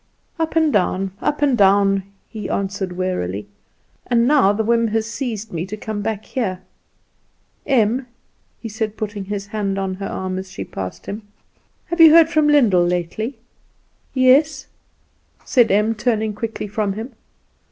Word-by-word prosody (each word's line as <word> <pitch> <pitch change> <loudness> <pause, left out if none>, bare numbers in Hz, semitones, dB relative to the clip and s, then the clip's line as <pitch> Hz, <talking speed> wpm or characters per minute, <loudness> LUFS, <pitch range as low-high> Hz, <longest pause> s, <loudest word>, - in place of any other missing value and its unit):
"Up 320 -1 -2
and 320 -2 +3
down, 190 -1 +1
up 295 0 -1
and 275 -3 +3
down," 195 -1 +4 0.3
he 210 -4 -7
answered 195 -1 -2
wearily; 105 - -2 0.6
"and 235 -1 +3
now 275 -9 +5
the 215 +2 -1
whim 230 +1 +2
has 220 0 -1
seized 230 -4 -5
me 165 0 -2
to 215 +3 -6
come 215 -1 -5
back 215 0 -3
here. 190 -8 -3 1.1
Em," 245 -1 +2 0.5
he 230 - -6
said, 220 -1 -4
putting 205 -2 -4
his 200 0 -4
hand 200 -1 -3
on 195 -1 -2
her 195 +1 -5
arm 185 0 -4
as 190 0 -9
she - - -5
passed 95 -1 -7
him, 210 +2 -5 0.6
"have 340 0 0
you 325 - +11
heard 325 0 +7
from 310 -2 +2
Lyndall 235 -12 +4
lately?" 180 +8 -2 0.8
"Yes," 270 +4 +4 0.8
said 240 -3 +4
Em, 210 +3 +2
turning 220 -1 -1
quickly 220 0 -5
from 205 -1 -1
him. 225 +6 -7
215 Hz, 155 wpm, -20 LUFS, 195-245 Hz, 1.1 s, you